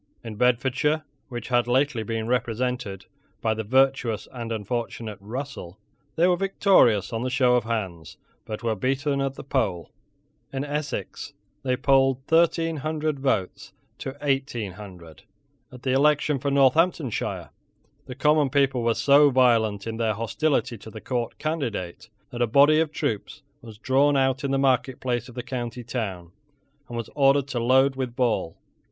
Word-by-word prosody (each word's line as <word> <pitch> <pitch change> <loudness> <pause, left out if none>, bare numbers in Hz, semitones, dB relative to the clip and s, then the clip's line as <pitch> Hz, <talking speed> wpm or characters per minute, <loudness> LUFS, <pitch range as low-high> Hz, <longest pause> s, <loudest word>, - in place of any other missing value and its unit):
In 115 -2 -6
Bedfordshire, 130 +6 +1 0.3
which 120 -1 -6
had 120 -1 +2
lately 130 -1 +1
been 110 +1 -3
represented 125 -3 -2 0.3
by 110 - 0
the 110 0 -4
virtuous 130 -1 +1
and 120 -2 -6
unfortunate 110 0 -4
Russell, 110 -4 -7 0.4
they 170 +2 +4
were 180 - +4
victorious 180 - +3
on 115 - -2
the 130 - -1
show 125 -1 +3
of 120 - +1
hands, 95 -9 -4 0.3
but 110 +2 -7
were 115 -1 +1
beaten 135 +5 -1
at 135 0 -2
the - - -9
poll. 105 - -2 0.6
In 135 +1 -3
Essex 145 -8 -4 0.3
they 125 -1 0
polled 135 -1 +2
thirteen 165 0 +2
hundred 155 0 -2
votes 120 -9 -2 0.3
to 135 +1 -6
eighteen 135 -7 -1
hundred. 90 -7 -12 0.5
At 125 -1 -13
the 130 - 0
election 150 +1 +2
for 140 +2 -1
Northamptonshire 140 - +1 0.6
the 125 - -7
common 150 0 +3
people 135 -2 +2
were 115 -1 +1
so 145 +1 +5
violent 115 -6 +2
in 115 -1 -4
their 110 -2 0
hostility 120 0 -1
to 110 - -11
the 110 - -9
court 120 0 -3
candidate 125 - -4 0.2
that 120 - -5
a 120 - +3
body 140 +6 +5
of 160 -2 0
troops 105 -8 -4 0.2
was 110 -2 -12
drawn 140 +5 +2
out 135 0 +1
in 140 - -1
the 135 - +1
marketplace 130 -2 0
of 120 - -13
the 125 - -4
county 120 -1 -5
town, 100 -8 -5 0.6
and 120 - -6
was 115 - -5
ordered 140 -1 +3
to 125 - -2
load 130 +3 +3
with 130 -2 -4
ball. 115 -10 0
125 Hz, 160 wpm, -25 LUFS, 115-140 Hz, 0.6 s, so